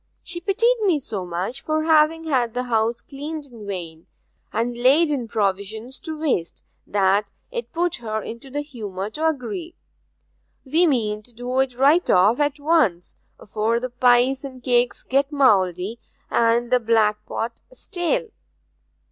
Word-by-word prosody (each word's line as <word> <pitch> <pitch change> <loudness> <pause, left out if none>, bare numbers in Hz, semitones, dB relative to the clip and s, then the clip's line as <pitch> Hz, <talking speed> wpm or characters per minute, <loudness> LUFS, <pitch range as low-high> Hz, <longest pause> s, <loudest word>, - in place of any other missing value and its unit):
She 345 0 -6
pitied 460 +7 +2
me 375 -7 +3
so 200 -8 -5
much 180 +9 -4
for 310 0 -1
having 320 0 +4
had 250 -7 0
the 250 - 0
house 230 -1 0
cleaned 295 +2 -6
in 230 -6 -12
vain, 170 -4 -6 0.4
and 235 +2 -1
laid 280 +7 +4
in 255 -5 -2
provisions 215 +4 -2
to 315 -2 -6
waste, 260 - -1 0.2
that 200 +1 +2 0.2
it 475 -1 -5
put 345 +1 0
her 220 -3 -3
into 235 +4 -8
the 290 +2 -3
humour 210 -8 -6
to 315 +7 0
agree. 325 +4 -3 0.9
We 325 +6 +3
mean 215 -7 0
to 245 - -19
do 245 +2 -3
it 260 -2 0
right 290 +7 +4
off 205 +7 +4
at 290 0 0
once, 285 - +1 0.3
afore 220 +3 -1
the 255 0 -5
pies 250 +2 +3
and 260 -3 -9
cakes 245 -1 +1
get 275 +2 +1
mouldy 200 - +2 0.3
and 235 +1 +2
the 250 - +5
blackpot 225 0 0
stale. 465 +1 -2
250 Hz, 150 wpm, -22 LUFS, 220-300 Hz, 0.9 s, the